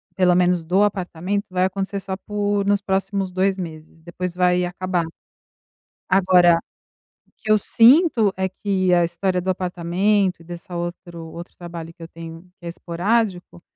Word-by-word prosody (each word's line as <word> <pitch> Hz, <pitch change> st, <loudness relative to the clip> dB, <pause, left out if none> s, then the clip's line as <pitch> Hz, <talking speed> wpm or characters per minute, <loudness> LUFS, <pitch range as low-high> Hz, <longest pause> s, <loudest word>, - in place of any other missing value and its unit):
pelo 180 Hz, -2 st, +3 dB
menos 180 Hz, -1 st, +2 dB
do 185 Hz, +5 st, +2 dB
apartamento, 195 Hz, 0 st, -2 dB
vai 185 Hz, 0 st, +1 dB
acontecer 195 Hz, +1 st, -3 dB
só 195 Hz, -1 st, -5 dB
por 205 Hz, +1 st, -1 dB
nos 200 Hz, 0 st, +2 dB
próximos 195 Hz, -1 st, -1 dB
2 190 Hz, +1 st, +1 dB
meses, 160 Hz, -2 st, -9 dB
depois 180 Hz, +1 st, -5 dB
vai 180 Hz, 0 st, +2 dB
acabar. 180 Hz, 0 st, -2 dB, 1.0 s
Agora, 180 Hz, -3 st, +5 dB, 0.7 s
o -, -, -34 dB
que 215 Hz, -, -3 dB
eu 215 Hz, -, +6 dB
sinto 235 Hz, -, +4 dB
é 190 Hz, 0 st, -1 dB
que 190 Hz, -1 st, -1 dB
a 175 Hz, -, +4 dB
história 180 Hz, +2 st, -1 dB
do 185 Hz, +1 st, -1 dB
apartamento 185 Hz, +2 st, 0 dB
e -, -, -14 dB
dessa 175 Hz, +1 st, -9 dB
outro 175 Hz, -1 st, -6 dB
outro 170 Hz, +2 st, -10 dB
trabalho 170 Hz, -1 st, -8 dB
que 170 Hz, -, -20 dB
eu 165 Hz, -, -7 dB
tenho, 165 Hz, 0 st, -10 dB, 0.2 s
que 175 Hz, -, -14 dB
é -, -, -4 dB
esporádico, 180 Hz, +2 st, -2 dB
180 Hz, 160 wpm, -21 LUFS, 175-195 Hz, 1.0 s, eu